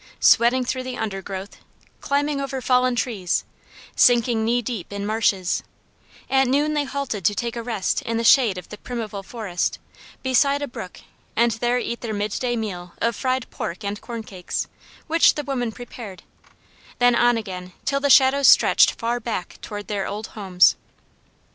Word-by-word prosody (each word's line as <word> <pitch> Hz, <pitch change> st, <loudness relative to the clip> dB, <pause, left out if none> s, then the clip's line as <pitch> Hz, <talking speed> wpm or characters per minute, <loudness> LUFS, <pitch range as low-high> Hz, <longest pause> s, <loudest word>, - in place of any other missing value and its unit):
Sweating 245 Hz, +2 st, +4 dB
through 255 Hz, +1 st, -2 dB
the 255 Hz, -1 st, -6 dB
undergrowth; 195 Hz, -2 st, -5 dB, 0.4 s
climbing 285 Hz, 0 st, 0 dB
over 270 Hz, -1 st, -3 dB
fallen 250 Hz, 0 st, +2 dB
trees; 215 Hz, -8 st, -1 dB, 0.5 s
sinking 240 Hz, -2 st, +4 dB
knee 235 Hz, +2 st, +2 dB
deep 230 Hz, -6 st, -5 dB
in 200 Hz, 0 st, -4 dB
marshes; 205 Hz, -4 st, +1 dB, 0.7 s
at 265 Hz, 0 st, +3 dB
noon 290 Hz, +4 st, +2 dB
they 295 Hz, -1 st, 0 dB
halted 270 Hz, -8 st, -4 dB
to 205 Hz, +5 st, +2 dB
take 235 Hz, +1 st, -3 dB
a 235 Hz, -, -3 dB
rest 225 Hz, -5 st, -1 dB
in 230 Hz, 0 st, -2 dB
the 230 Hz, -, -1 dB
shade 230 Hz, -5 st, +5 dB
of 180 Hz, -, -9 dB
the 210 Hz, -, -9 dB
primeval 225 Hz, -5 st, -5 dB
forest, 195 Hz, -4 st, -3 dB, 0.5 s
beside 275 Hz, +2 st, +2 dB
a -, -, -2 dB
brook, 185 Hz, -7 st, -9 dB, 0.3 s
and 235 Hz, +1 st, +3 dB
there 240 Hz, +2 st, 0 dB
eat 235 Hz, -1 st, -3 dB
their 220 Hz, -3 st, -3 dB
mid 205 Hz, 0 st, -2 dB
day 245 Hz, -1 st, -1 dB
meal 180 Hz, -6 st, -5 dB
of 230 Hz, -1 st, 0 dB
fried 255 Hz, +1 st, -1 dB
pork 175 Hz, +6 st, -5 dB
and 205 Hz, +1 st, -4 dB
corn 230 Hz, -2 st, -6 dB
cakes, 185 Hz, -4 st, -4 dB, 0.4 s
which 325 Hz, +1 st, +4 dB
the 295 Hz, -, -3 dB
women 250 Hz, -5 st, -2 dB
prepared; 220 Hz, -5 st, -10 dB, 0.7 s
then 245 Hz, 0 st, +4 dB
on 240 Hz, 0 st, +4 dB
again, 185 Hz, -4 st, -6 dB
till 275 Hz, 0 st, +1 dB
the 285 Hz, 0 st, 0 dB
shadows 270 Hz, 0 st, +6 dB
stretched -, -, +6 dB
far 235 Hz, +1 st, -1 dB
back 220 Hz, -6 st, -5 dB
toward 205 Hz, -2 st, -7 dB
their 200 Hz, -2 st, -2 dB
old 210 Hz, +2 st, -5 dB
homes. 190 Hz, -4 st, +3 dB
235 Hz, 170 wpm, -23 LUFS, 205-255 Hz, 0.7 s, shadows